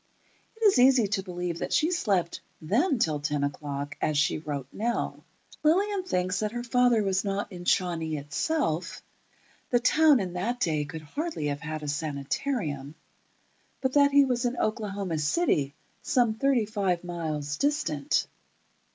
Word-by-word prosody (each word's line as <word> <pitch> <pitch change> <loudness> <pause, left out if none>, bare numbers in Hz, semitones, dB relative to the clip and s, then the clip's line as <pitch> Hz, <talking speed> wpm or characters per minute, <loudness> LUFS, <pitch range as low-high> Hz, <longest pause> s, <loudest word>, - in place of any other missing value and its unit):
It 445 0 -2
is 390 -11 +6
easy 255 -2 +6
to 200 -1 0
believe 175 -2 -4
that - - -4
she 320 +3 +3
slept 195 - 0 0.2
then 255 - +1
till 155 -9 +1
ten 145 0 -1
o'clock, 145 0 -4
as 150 - +1
she 150 +1 +2
wrote 145 -3 -4
Nell. 235 +3 -2 0.4
Lillian 385 +6 +2
thinks 185 - 0
that 215 0 -2
her 240 0 -3
father 245 -2 +3
was 190 -1 +1
not 200 0 -2
in 175 -1 -8
Shawnee 165 -4 +1
itself 165 - -2 0.7
(the 245 - +3
town 305 +2 +5
in 185 -3 -3
that 225 +8 -2
day 155 -8 0
could 155 +2 -8
hardly 295 - -4
have 145 0 -3
had 155 -1 -5
a - - -5
sanitarium), 145 - -3 0.8
but 260 -1 -1
that 285 -1 +6
he 280 0 +5
was 250 -2 0
in 245 0 -1
Oklahoma 200 -6 -2
City, 150 - +1 0.3
some 240 -3 +2
thirty 250 0 +2
five 195 -5 -1
miles 155 -4 -3
distant. 280 - 0
190 Hz, 155 wpm, -27 LUFS, 155-250 Hz, 0.8 s, is